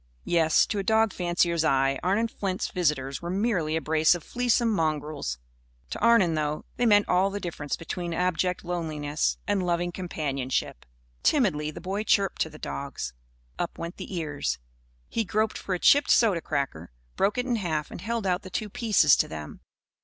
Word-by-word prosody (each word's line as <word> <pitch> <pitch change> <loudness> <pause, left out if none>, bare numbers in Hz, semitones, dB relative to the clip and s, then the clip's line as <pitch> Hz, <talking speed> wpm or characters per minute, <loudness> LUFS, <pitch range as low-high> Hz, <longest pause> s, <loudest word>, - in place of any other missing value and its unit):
Yes, 165 -2 +4
to 210 - -2
a - - -1
dog 220 +1 +3
fancier's 175 -2 +1
eye, 135 -2 +2
Arnon 200 +6 +1
Flint's 195 -4 -3
visitors 145 -6 -1
were 170 - -5
merely 185 -5 0
a 160 - 0
brace 160 +2 +3
of 175 - -7
fleasome 240 -1 +1
mongrels. 150 - -1 0.5
To - - -4
Arnon, 230 -8 +4
though, 150 -1 -2
they 245 - +2
meant 205 -1 +5
all 185 +2 +3
the 200 +1 -4
difference 165 -6 -4
between 175 +1 -5
abject 180 +1 0
loneliness 155 -4 -1
and 205 -2 0
loving 175 0 0
companionship. 140 - -3 0.3
Timidly 185 - +2
the 155 - -8
boy 195 +3 -2
chirped 200 -2 +1
to 160 - +1
the 155 - -12
dogs. 140 - -5 0.5
Up - - -3
went 170 +2 -6
their - - -7
ears. 155 -6 -2 0.5
He 225 - -1
groped 215 +2 0
for 190 - -2
a - - -1
chipped 285 +8 +5
soda 205 -8 +4
cracker, 135 - -3 0.3
broke 200 +4 +1
it 250 - 0
in 245 -2 0
half 160 -7 -2
and - - -8
held 225 +1 -2
out 180 0 +1
the 185 - -10
two 210 +3 -3
pieces 195 - +4
to - - +2
them. 75 -1 -8
175 Hz, 180 wpm, -27 LUFS, 155-205 Hz, 0.5 s, meant